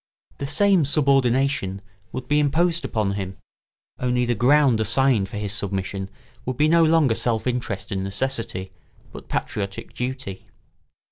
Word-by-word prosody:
The 140 - -3
same 185 +4 +3
subordination 135 -7 +2 0.3
would 130 - -6
be 150 0 +2
imposed 165 +4 +2
upon 105 -3 -1
him, 95 -1 -5 0.6
only 125 0 +1
the 120 - +1
ground 130 +1 +4
assigned 120 -4 +2
for 105 - -6
his 105 -1 -3
submission 95 -1 -3 0.3
would 130 -1 -4
be 150 +2 +3
no 165 +1 +5
longer 155 -6 +4
self 115 -1 0
interest 120 -5 -3
and 95 -1 -2
necessity, 100 -2 -2 0.4
but - - -11
patriotic 100 -1 -4
duty. 125 -6 -5
125 Hz, 140 wpm, -23 LUFS, 100-140 Hz, 0.6 s, no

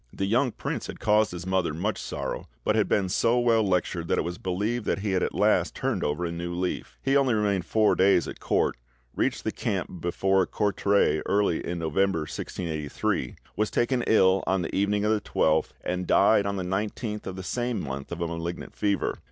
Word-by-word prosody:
The 95 - -2
young 120 +5 +2
prince - - -4
had - - -8
caused 105 +1 +3
his 90 0 -6
mother 95 -4 0
much 100 +6 -2
sorrow, - - -4 0.2
but 105 - +2
had 110 -2 +2
been 100 -2 +2
so 115 +6 +2
well 120 -2 +3
lectured 90 -3 0
that - - +1
it - - +1
was 85 0 -5
believed 105 +5 -2
that - - 0
he 105 -1 -1
had 95 -1 +1
at - - -1
last - - +2
turned - - -1
over 75 +4 -1
a 85 - -2
new 85 +1 -4
leaf." 90 +1 -3
He 135 +1 +2
only 135 -4 +3
remained 100 -4 +1
four 110 -1 +3
days 95 -2 +3
at - - -7
court, - - +1 0.4
reached - - 0
the - - -1
camp 90 - -3
before 95 +2 +1
Courtrai 100 -6 +2
early 100 -4 +1
in 85 - -3
November 85 +1 +1
1683, 75 -5 -3 0.2
was 110 0 0
taken 120 +1 +1
ill 95 -3 +4
on 95 -1 +1
the - - -4
evening 100 +1 +1
of 105 - +2
the 110 -1 +1
12th, 80 0 +1
and 90 0 -2
died 100 - +4
on 100 - -1
the 95 - -2
19th 105 +3 -3
of 95 - -4
the 95 - -6
same 120 +2 -2
month 70 -3 -5
of 85 0 -5
a 85 - 0
malignant 85 +1 -5
fever. 100 -1 0
95 Hz, 210 wpm, -26 LUFS, 85-105 Hz, 0.4 s, ill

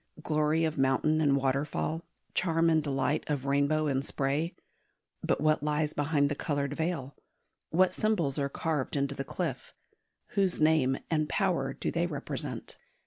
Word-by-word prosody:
Glory 155 +1 +2
of 155 -2 -2
mountain 135 +4 +2
and 140 -3 +4
waterfall, 140 +4 -1 0.3
charm 165 -2 +2
and 160 -1 +4
delight 140 0 0
of 145 -3 -2
rainbow 140 +3 +2
in 135 -2 +1
spray; 140 +4 -1 0.7
but - - +1
what 155 0 +3
lies 150 0 0
behind 145 -1 +2
the 145 - -1
coloured 145 -1 -2
veil? 155 -4 -2 0.5
What 185 +2 +3
symbols 175 -11 0
are 140 0 0
carved 150 -2 -2
into 140 0 0
the 135 - -4
cliff? 140 -5 -4 0.5
Whose 195 -3 +1
name 155 -4 +3
and 155 -1 +1
power - - +1
do - - -3
they - - 0
represent? - - -5
150 Hz, 150 wpm, -30 LUFS, 140-160 Hz, 0.7 s, and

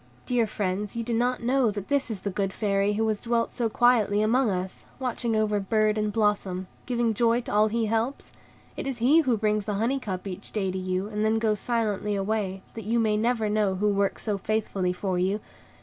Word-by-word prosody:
"Dear 240 -3 +1
friends, 200 0 -2
do 230 - -2
you 235 - -1
not 245 +1 0
know 255 0 +3
that 205 -1 -5
this 280 -3 +1
is 210 -4 -4
the 200 - -2
good 195 0 -1
Fairy 200 0 +1
who 220 +2 0
has 215 -1 -1
dwelt 235 -1 0
so 235 -2 0
quietly 220 -3 +3
among 240 +2 +3
us, 185 -1 -3 0.2
watching 240 -3 -1
over 215 -1 +1
bird 215 +1 +2
and 210 -1 0
blossom, 205 -4 0 0.2
giving 240 -2 +1
joy 235 +2 +2
to 240 - -6
all 210 +1 +5
he 225 +1 0
helps? 225 +5 -2 0.4
It - - -4
is 265 -3 -2
HE 260 +8 +5
who 255 -7 +1
brings 210 -1 0
the 210 -1 -2
honey 235 +7 0
cup 190 -7 -5
each 195 +1 -7
day 195 -3 0
to 190 - -3
you, 185 +1 -1
and 210 0 -2
then 220 +1 +2
goes 215 -2 +1
silently 210 -3 -1
away, 195 -1 -2
that 225 -3 -7
you 230 +2 +1
may 215 -2 +2
never 225 0 +1
know 210 -2 +1
who 210 +3 +1
works 200 -1 0
so 205 -3 -1
faithfully 200 -3 -1
for 180 0 -2
you. 190 +3 +1
215 Hz, 220 wpm, -26 LUFS, 200-230 Hz, 0.4 s, all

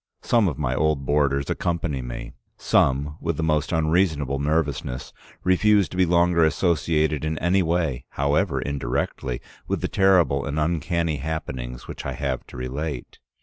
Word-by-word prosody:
Some 115 -4 +3
of 80 - -2
my 70 -4 -1
old 75 -1 +1
boarders 70 -1 +1
accompany 85 -5 -1
me, - - -7 0.2
some, 70 +3 +1
with 85 -3 -1
the 80 - -1
most 75 -1 +1
unreasonable 80 -4 +1
nervousness, 70 -3 -1 0.3
refuse 100 +2 +4
to - - -8
be 90 -1 +3
longer 85 0 +3
associated 80 -2 +1
in 80 0 -1
any 90 +4 +2
way, 80 -7 0
however 70 +2 +1
indirectly, 65 -1 -2 0.3
with - - -1
the - - 0
terrible 90 -8 +3
and 70 +2 -2
uncanny 80 0 0
happenings 65 -5 -5
which - - -7
I - - -3
have 65 -4 -3
to - - -11
relate. 65 +2 -5
75 Hz, 150 wpm, -24 LUFS, 70-85 Hz, 0.3 s, refuse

